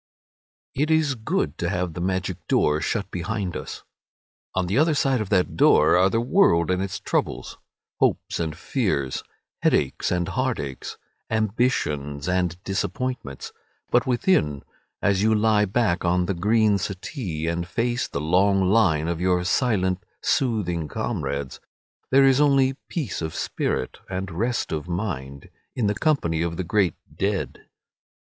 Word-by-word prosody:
VII. 135 Hz, -, -2 dB
It 155 Hz, -, +1 dB
is 160 Hz, -3 st, +3 dB
good 110 Hz, -, -2 dB
to 85 Hz, -, 0 dB
have 90 Hz, -2 st, -2 dB
the 85 Hz, -, -5 dB
magic 95 Hz, 0 st, -1 dB
door 75 Hz, +1 st, +2 dB
shut -, -, -2 dB
behind 95 Hz, +1 st, -3 dB
us. -, -, -6 dB, 0.7 s
On 95 Hz, -1 st, +1 dB
the 95 Hz, +4 st, -1 dB
other 155 Hz, +3 st, +3 dB
side 135 Hz, -4 st, +2 dB
of 105 Hz, -, -4 dB
that 95 Hz, -3 st, +1 dB
door 75 Hz, -, +5 dB
are 95 Hz, +2 st, +5 dB
the 115 Hz, -, +1 dB
world 115 Hz, -, +3 dB
and 90 Hz, 0 st, +1 dB
its 95 Hz, -1 st, -3 dB
troubles, -, -, -2 dB, 0.4 s
hopes -, -, +1 dB
and 80 Hz, -2 st, -3 dB
fears, 90 Hz, -, -1 dB, 0.4 s
headaches 65 Hz, -, +1 dB
and 90 Hz, -1 st, 0 dB
heartaches, 115 Hz, -, -3 dB, 0.3 s
ambitions 95 Hz, -, 0 dB
and 90 Hz, -2 st, 0 dB
disappointments; 105 Hz, -, -3 dB, 0.4 s
but 120 Hz, +1 st, +3 dB
within, 120 Hz, -, +1 dB, 0.4 s
as 100 Hz, -1 st, +2 dB
you 110 Hz, +1 st, +3 dB
lie 105 Hz, -1 st, +3 dB
back 100 Hz, -3 st, 0 dB
on 90 Hz, +1 st, +2 dB
the 95 Hz, -, -1 dB
green 105 Hz, +3 st, +2 dB
settee, 95 Hz, -, -4 dB
and 85 Hz, +1 st, -2 dB
face 120 Hz, +5 st, -1 dB
the -, -, -4 dB
long 95 Hz, +5 st, +3 dB
lines 90 Hz, -8 st, +3 dB
of 85 Hz, 0 st, -4 dB
your 90 Hz, -1 st, +2 dB
silent 95 Hz, -1 st, +1 dB, 0.2 s
soothing 95 Hz, -, 0 dB
comrades, 70 Hz, -2 st, -3 dB, 0.5 s
there 135 Hz, +1 st, +6 dB
is 135 Hz, +1 st, +4 dB
only 135 Hz, -2 st, +4 dB
peace 145 Hz, -, -3 dB
of 80 Hz, -1 st, -4 dB
spirit 65 Hz, -, -2 dB
and 95 Hz, 0 st, -4 dB
rest 115 Hz, +8 st, -1 dB
of 80 Hz, +1 st, -3 dB
mind 70 Hz, -8 st, -4 dB, 0.2 s
in 120 Hz, -, 0 dB
the 105 Hz, -, +2 dB
company 105 Hz, -, +1 dB
of 85 Hz, -1 st, -2 dB
the 95 Hz, -, -1 dB
great 95 Hz, -1 st, +1 dB, 0.2 s
dead. 100 Hz, -1 st, -2 dB
95 Hz, 150 wpm, -24 LUFS, 85-115 Hz, 0.7 s, there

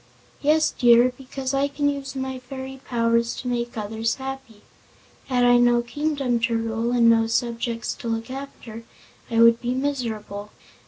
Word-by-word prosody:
"Yes, 310 Hz, +2 st, +3 dB
dear, 240 Hz, +1 st, +5 dB
because 265 Hz, 0 st, -5 dB
I 275 Hz, +1 st, +2 dB
can 285 Hz, +1 st, -1 dB
use 280 Hz, -1 st, -3 dB
my 265 Hz, -1 st, -4 dB
fairy 265 Hz, +1 st, -8 dB
powers 230 Hz, -1 st, +1 dB
to 250 Hz, -, -6 dB
make 240 Hz, -1 st, -2 dB
others 220 Hz, +2 st, -2 dB
happy. 265 Hz, -5 st, -8 dB, 0.6 s
Had 250 Hz, -2 st, +1 dB
I 245 Hz, 0 st, +6 dB
no 240 Hz, 0 st, +4 dB
kingdom 275 Hz, -2 st, -1 dB
to 230 Hz, 0 st, +1 dB
rule, 225 Hz, +1 st, -2 dB
and 240 Hz, -1 st, +4 dB
no 225 Hz, -1 st, +4 dB
subjects 230 Hz, 0 st, -2 dB
to -, -, -7 dB
look 225 Hz, +2 st, -3 dB
after, 260 Hz, -4 st, -8 dB, 0.5 s
I 230 Hz, -1 st, +2 dB
would 230 Hz, 0 st, +5 dB
be 245 Hz, 0 st, -1 dB
miserable. 225 Hz, -7 st, -3 dB
245 Hz, 160 wpm, -24 LUFS, 230-265 Hz, 0.6 s, I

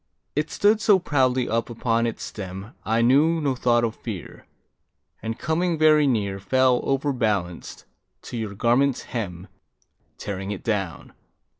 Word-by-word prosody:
It 150 Hz, +2 st, 0 dB
stood 210 Hz, +1 st, +3 dB
so 205 Hz, -1 st, +5 dB
proudly 130 Hz, -7 st, +1 dB
up 115 Hz, +1 st, -1 dB
upon 115 Hz, 0 st, 0 dB
its 115 Hz, -, -5 dB
stem, 95 Hz, +2 st, -7 dB
I 115 Hz, +2 st, +1 dB
knew 150 Hz, +7 st, +4 dB
no 140 Hz, -3 st, 0 dB
thought 120 Hz, -2 st, +2 dB
of 115 Hz, -2 st, 0 dB
fear, 105 Hz, -7 st, -8 dB, 0.7 s
And 115 Hz, +1 st, -4 dB
coming 170 Hz, +1 st, 0 dB
very 155 Hz, -1 st, +5 dB
near 100 Hz, -6 st, 0 dB
Fell, 130 Hz, +4 st, +2 dB
overbalanced, 115 Hz, -, -1 dB, 0.4 s
to -, -, -8 dB
your 110 Hz, -4 st, -4 dB
garment's 125 Hz, +5 st, +2 dB
hem, 95 Hz, -6 st, -5 dB, 0.7 s
Tearing 95 Hz, -1 st, -5 dB
it 105 Hz, -2 st, -5 dB
down. 100 Hz, -6 st, -3 dB
120 Hz, 140 wpm, -24 LUFS, 105-140 Hz, 0.7 s, so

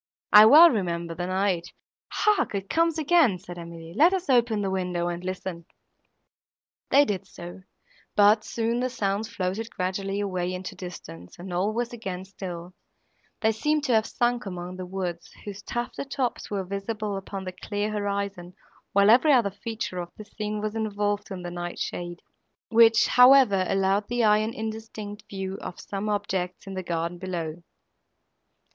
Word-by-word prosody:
I 210 Hz, +1 st, +10 dB
well 320 Hz, +7 st, +9 dB
remember 170 Hz, -6 st, -2 dB
the 175 Hz, +1 st, -4 dB
night!"— 185 Hz, -2 st, -1 dB, 0.4 s
"Hark! 420 Hz, -, +1 dB
it 195 Hz, 0 st, -4 dB
comes 330 Hz, 0 st, +2 dB
again!" 310 Hz, -, +4 dB
said 175 Hz, 0 st, -10 dB
Emily, 170 Hz, -1 st, -9 dB
"let 335 Hz, -, +5 dB
us 370 Hz, -6 st, -2 dB
open 235 Hz, -4 st, +3 dB
the 195 Hz, -, -1 dB
window, 180 Hz, -2 st, -1 dB
and 175 Hz, 0 st, -5 dB
listen." 185 Hz, -2 st, -5 dB, 1.2 s
They 285 Hz, +1 st, +6 dB
did 195 Hz, -4 st, -3 dB
so; 175 Hz, +1 st, -10 dB, 0.5 s
but, 210 Hz, +1 st, +5 dB
soon, 230 Hz, +1 st, -1 dB
the 255 Hz, +1 st, 0 dB
sounds 210 Hz, -2 st, -2 dB
floated 195 Hz, +3 st, -3 dB
gradually 195 Hz, +1 st, -3 dB
away 185 Hz, -3 st, -2 dB
into 185 Hz, 0 st, -6 dB
distance, 90 Hz, -, -10 dB
and 180 Hz, +1 st, -7 dB
all 185 Hz, +4 st, +1 dB
was 240 Hz, +2 st, -3 dB
again 190 Hz, -5 st, -5 dB
still; 180 Hz, -2 st, -8 dB, 0.7 s
they 220 Hz, -, +3 dB
seemed 300 Hz, +7 st, 0 dB
to 255 Hz, -, +1 dB
have 220 Hz, -1 st, +3 dB
sunk 240 Hz, -2 st, 0 dB
among 180 Hz, -1 st, -6 dB
the 185 Hz, -1 st, -6 dB
woods, 180 Hz, -2 st, -4 dB, 0.2 s
whose 205 Hz, -1 st, -7 dB
tufted 240 Hz, +5 st, -4 dB
tops 260 Hz, -3 st, -2 dB
were 200 Hz, -2 st, -2 dB
visible 200 Hz, +2 st, -4 dB
upon 195 Hz, 0 st, -6 dB
the 185 Hz, -, -5 dB
clear 205 Hz, +3 st, -3 dB
horizon, 200 Hz, -3 st, -3 dB, 0.4 s
while 200 Hz, +1 st, +6 dB
every 265 Hz, +6 st, +6 dB
other 235 Hz, -7 st, +4 dB
feature 210 Hz, -2 st, -5 dB
of 175 Hz, -1 st, -5 dB
the 215 Hz, -, -9 dB
scene 210 Hz, 0 st, -4 dB
was 215 Hz, 0 st, -2 dB
involved 205 Hz, -2 st, -2 dB
in 185 Hz, -3 st, -6 dB
the 175 Hz, -, -5 dB
night 175 Hz, 0 st, -5 dB
shade, 175 Hz, 0 st, -5 dB, 0.5 s
which, 225 Hz, 0 st, +6 dB
however, 250 Hz, -7 st, +6 dB
allowed 195 Hz, +1 st, +1 dB
the 245 Hz, 0 st, 0 dB
eye 210 Hz, -1 st, +5 dB
an 220 Hz, +1 st, -2 dB
indistinct 220 Hz, -1 st, -6 dB
view 190 Hz, -1 st, -5 dB
of -, -, -7 dB
some 200 Hz, +1 st, -4 dB
objects 185 Hz, -3 st, -2 dB
in 195 Hz, -, -7 dB
the 190 Hz, -, -3 dB
garden 170 Hz, 0 st, -3 dB
below. 170 Hz, -3 st, -4 dB
200 Hz, 165 wpm, -26 LUFS, 180-220 Hz, 1.2 s, I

